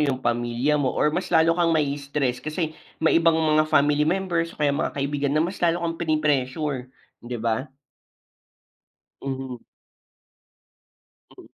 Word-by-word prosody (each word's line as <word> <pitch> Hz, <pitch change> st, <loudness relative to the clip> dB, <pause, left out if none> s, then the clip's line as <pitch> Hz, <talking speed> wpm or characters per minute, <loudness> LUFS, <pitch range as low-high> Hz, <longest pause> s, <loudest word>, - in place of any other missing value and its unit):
yung 135 Hz, -3 st, 0 dB
pamilya 120 Hz, +5 st, +1 dB
mo 135 Hz, -3 st, 0 dB
or -, -, +2 dB
mas 180 Hz, +4 st, -2 dB
lalo 160 Hz, +1 st, +5 dB
kang 170 Hz, -2 st, +2 dB
mai-stress? 140 Hz, -3 st, -1 dB
Kasi 155 Hz, 0 st, -3 dB, 0.3 s
may 160 Hz, -, +5 dB
ibang 165 Hz, 0 st, +4 dB
mga 155 Hz, -1 st, +3 dB
family 150 Hz, 0 st, +3 dB
members 170 Hz, -1 st, 0 dB
o -, -, -25 dB
kaya 145 Hz, -1 st, +3 dB
mga 140 Hz, -, -2 dB
kaibigan 140 Hz, 0 st, -1 dB
na 155 Hz, -, +3 dB
mas 180 Hz, +4 st, -3 dB
lalo 170 Hz, 0 st, +1 dB
kang 165 Hz, -1 st, -2 dB
prini-pressure, 150 Hz, -4 st, 0 dB, 0.4 s
'di 120 Hz, 0 st, -4 dB
ba? 115 Hz, +4 st, -1 dB, 1.6 s
Mhm. 130 Hz, -3 st, -5 dB, 1.7 s
Mm. -, -, -13 dB
150 Hz, 140 wpm, -24 LUFS, 135-165 Hz, 1.7 s, lalo